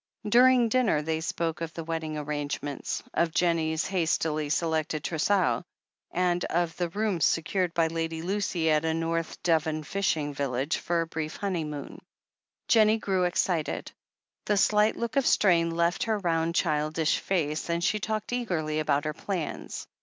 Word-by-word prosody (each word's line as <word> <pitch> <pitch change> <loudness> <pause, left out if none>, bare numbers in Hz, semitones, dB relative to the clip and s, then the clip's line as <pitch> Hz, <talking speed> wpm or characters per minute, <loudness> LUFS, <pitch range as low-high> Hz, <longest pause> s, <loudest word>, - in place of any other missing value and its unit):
During 245 +2 +6
dinner 220 -11 +2
they 160 +1 -1
spoke 165 0 -2
of 165 0 -5
the 165 - -4
wedding 160 -1 -3
arrange 145 -1 -3
ments, 145 -1 -4
of 170 -1 +1
Jennie's 165 -2 +1
hastily 160 -4 0
selected 155 -1 0
trousseau, 175 +3 +1 0.5
and 175 0 0
of 170 -1 -1
the 175 -1 -1
rooms 200 -3 -1
secured 175 +2 +1
by 165 - +3
Lady 165 0 -3
Lucy 180 -4 0
at 155 0 +3
a 160 0 0
North 165 0 -2
Devon 160 -2 +1
fishing 155 -5 -1
village 140 0 -1
for 170 -1 0
the - - -1
brief 155 -1 -4
honeymoon. 160 -7 -4 0.7
Jennie 220 -1 +5
grew 190 -4 0
excited; 175 -2 -1 0.6
the 210 - +2
slight 210 +2 +3
look 235 +3 -3
of 275 - +3
strain 170 -4 +4
left 170 +1 0
her 220 -2 +1
round, 170 -3 0
childish 155 -1 +1
face, 160 -4 -1
and 170 0 0
she 210 +3 +1
talked 215 +2 -3
eagerly 160 -11 -1
about 145 -1 +1
her 155 - -1
plans. 180 -1 -4
165 Hz, 155 wpm, -27 LUFS, 155-190 Hz, 0.7 s, During